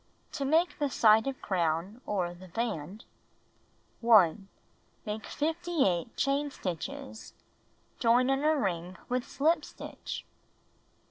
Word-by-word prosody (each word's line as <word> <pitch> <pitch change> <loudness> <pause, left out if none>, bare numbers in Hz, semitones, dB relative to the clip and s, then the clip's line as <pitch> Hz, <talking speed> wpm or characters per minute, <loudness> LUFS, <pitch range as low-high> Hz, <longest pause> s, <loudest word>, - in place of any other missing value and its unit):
To 280 - -3
Make 325 +6 +2
the 290 -1 +1
Side 220 -1 +5
of 270 -1 -3
Crown, 175 +5 -1
or 180 -4 -1
the 185 +1 -13
Band 195 -1 -4 0.9
1. 200 -4 +5 0.6
Make 215 0 -4
58 305 - 0
chain 280 +1 +1
stitches. 245 - -6 0.6
Join 250 +2 +4
in 270 +1 0
a 310 +1 +4
ring 180 -6 -2
with 250 0 0
slip 310 +5 +1
stitch. - - -7
230 Hz, 115 wpm, -30 LUFS, 185-280 Hz, 0.9 s, Side